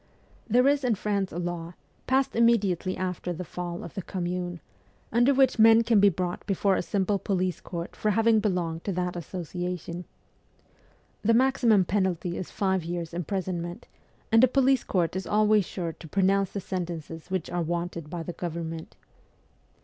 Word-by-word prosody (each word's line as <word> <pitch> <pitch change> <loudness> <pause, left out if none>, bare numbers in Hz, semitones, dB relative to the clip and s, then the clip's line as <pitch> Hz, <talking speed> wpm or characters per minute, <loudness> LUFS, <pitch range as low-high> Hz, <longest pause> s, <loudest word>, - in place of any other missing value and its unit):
There 250 +4 +4
is 285 0 +3
in 240 -3 +2
France 200 -1 -1
a - - -6
law, 175 -1 -4 0.3
passed 270 +1 +2
immediately 205 -6 +2
after 180 -1 -3
the 175 +1 -4
fall 175 0 -5
of - - -8
the 195 - -4
Commune, 175 -1 -3 0.5
under 240 +4 +4
which 265 -3 +3
men 225 +1 +7
can 225 -2 +4
be 200 0 +7
brought 180 -1 -3
before 195 -1 +2
a - - 0
simple 200 +2 0
police 185 -2 -1
court 170 -1 -6
for 215 - 0
having 225 +1 +4
belonged 175 -5 -1
to 200 - -1
that 180 0 -1
associa 180 +1 -4
tion. 170 +2 -7 1.2
The 230 +2 +3
maximum 235 -6 +4
penalty 180 -2 0
is 185 - -5
five 190 -3 0
years' 170 0 -4
imprison 180 +1 -2
ment; 175 +7 -7 0.4
and 225 +2 +6
a - - +8
police 265 0 +3
court 175 -2 0
is 190 - -3
always 210 -1 +3
sure 170 -2 -4
to 160 - -12
pronounce 195 +2 +2
the 200 - -4
sentences 170 -3 -5
which 185 -3 -2
are 175 0 -1
wanted 170 -1 -3
by 170 0 -4
the 175 - -5
government. 165 -1 -5
185 Hz, 170 wpm, -27 LUFS, 175-210 Hz, 1.2 s, a